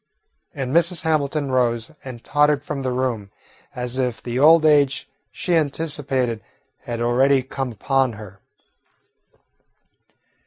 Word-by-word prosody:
And 135 0 -3
Mrs. 170 0 +3
Hamilton 150 -3 0
rose 120 -1 0
and 125 -3 -9
tottered 145 -1 +2
from 150 -2 -4
the 130 - -2
room, 125 -5 -2 0.5
as 125 +1 -3
if 125 -3 -1
the 120 +1 -4
old 155 +2 +6
age 145 -3 +3 0.2
she 180 - -3
anticipated 140 -6 -1 0.4
had 120 -1 -4
already 130 +3 +3
come 135 0 -4
upon 130 +3 0
her. 100 -2 -11
135 Hz, 120 wpm, -22 LUFS, 120-145 Hz, 0.5 s, old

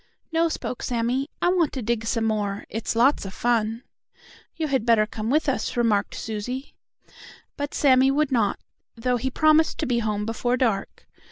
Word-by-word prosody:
"No," 330 +1 +2
spoke 250 - -5
Sammie, 245 +4 -1
"I 350 - +4
want 350 -4 +2
to 260 - -4
dig 225 0 -1
some 230 -1 0
more. 205 -2 -1
It's 225 +1 -3
lots 255 +5 +3
of 195 -1 -8
fun." 230 -1 0 0.7
"You 320 -2 -2
had 265 -5 0
better 230 -2 +4
come 215 +1 -5
with 305 +4 +2
us," 265 -2 -1
remarked 215 -4 +1
Susie. 245 +5 -5 0.8
But 285 0 -4
Sammie 265 -2 +5
would 290 +1 +1
not, 225 -5 +1 0.4
though 245 +1 0
he 265 +3 -2
promised 310 +3 +3
to - - -1
be 240 -1 +1
home 210 -2 -1
before 240 +2 -1
dark. 225 -7 -1
240 Hz, 175 wpm, -24 LUFS, 220-275 Hz, 0.8 s, Sammie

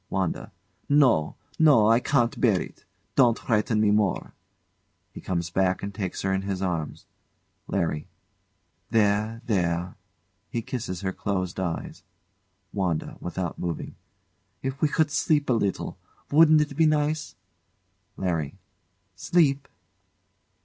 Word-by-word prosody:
] - - -46
WANDA. 95 -3 -2 0.4
No, 130 - +4 0.2
no! 145 -9 +6
I 115 +1 +5
can't 120 -2 +1
bear 110 -7 +4
it! - - -9 0.3
Don't 120 -4 +5
frighten 110 0 +1
me 105 -1 +4
more! 105 -3 0 0.8
[He - - -9
comes 85 -2 -2
back 95 0 +1
and 100 0 -4
takes 95 -3 -4
her 95 0 +1
in 95 - 0
his 95 -1 -3
arms.] 85 -5 -3 0.6
LARRY. 80 -6 -1 0.8
There, 110 +1 +1
there! 90 -4 0 0.6
[He 115 - -3
kisses 120 -8 -4
her 95 -1 -2
closed 95 -2 -2
eyes.] 85 -3 -4 0.7
WANDA. 90 -6 -2
[Without 90 0 -4
moving] 85 -2 -4 0.7
If 135 +1 -4
we 155 - +4
could 155 0 +1
sleep 145 -2 +1
a - - +5
little 100 -5 -2 0.3
wouldn't 155 +1 +6
it 150 -1 -2
be 160 +1 +4
nice? 155 +1 0 0.8
LARRY. 85 -6 -2 0.6
Sleep? 140 -5 +2
105 Hz, 130 wpm, -26 LUFS, 90-135 Hz, 0.8 s, no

